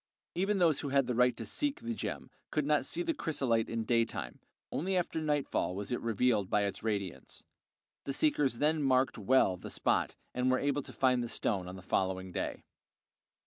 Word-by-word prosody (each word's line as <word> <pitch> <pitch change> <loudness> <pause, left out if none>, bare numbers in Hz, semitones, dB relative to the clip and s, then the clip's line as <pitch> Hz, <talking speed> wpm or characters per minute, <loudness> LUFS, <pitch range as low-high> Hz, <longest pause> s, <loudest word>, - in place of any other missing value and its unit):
Even 195 +3 +1
those 170 -5 +3
who 140 - -3
had 135 -1 +3
the 125 - -1
right 125 +1 +3
to - - -5
seek 290 -1 -1
the 235 0 -3
gem - - -5 0.2
could - - 0
not - - +2
see 350 - 0
the 335 -1 0
chrysolite 135 - 0
in 115 -1 -2
daytime; 115 - -1 0.3
only 185 +4 0
after 170 -2 -1
nightfall 145 -11 0
was 100 +3 -4
it 125 - -1
revealed 115 -3 +1
by 105 - +2
its 100 - -3
radiance; 100 -5 -4 0.6
the 140 - -2
seekers 140 -4 +2
then 155 +3 +2
marked 130 -3 +2
well 105 -4 +3
the 90 - -8
spot - - 0 0.2
and 125 +1 +1
were 130 - +3
able 145 +1 0
to - - -10
find 125 -2 +2
the 120 - -2
stone 95 -5 -1
on 90 - -7
the 95 - -10
following 95 0 -1
day. - - -3
125 Hz, 195 wpm, -32 LUFS, 105-150 Hz, 0.6 s, those